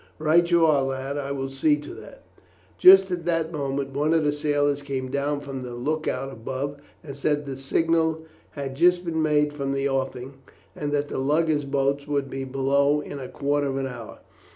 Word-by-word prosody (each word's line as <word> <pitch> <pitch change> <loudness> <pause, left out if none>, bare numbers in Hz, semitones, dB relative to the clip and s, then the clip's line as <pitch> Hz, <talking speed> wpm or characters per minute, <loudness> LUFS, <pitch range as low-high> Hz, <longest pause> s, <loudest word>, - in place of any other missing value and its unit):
"Right 160 +3 +3
you 170 -1 +4
are, 150 -3 +4
lad. 135 +1 -3
I 140 0 -4
will 135 -1 -3
see 145 +2 +2
to 145 0 -9
that." - - -13 0.6
Just 190 0 +8
at 175 -1 -2
this 165 -1 0
moment 140 -2 -3
one 150 +4 +1
of 160 - +2
the 145 - +2
sailors 145 -1 0
came 135 -2 -4
down 140 +1 -1
from 135 -2 -6
the 125 -1 -7
look 155 +6 -2
out 135 +1 -2
above, 135 +5 -5 0.2
and 140 -3 -8
said 145 +1 -1
that 140 - -6
the 135 - -7
signal 160 +2 +1 0.3
had 135 -1 -4
just 175 +3 +3
been 160 -1 -1
made 150 -1 +2
from 140 -2 -3
the 135 0 0
offing, 135 0 -3 0.4
and 145 -1 -3
that 145 0 -1
the - - -3
lugger's 150 +2 +1
boat 140 +1 0
would 140 -2 -1
be 135 0 -4
below 140 +2 +1
in 145 -1 -7
a 130 - -7
quarter 145 0 -1
of 135 0 -2
an 135 - -1
hour. 130 - -8
145 Hz, 205 wpm, -25 LUFS, 135-155 Hz, 0.6 s, Just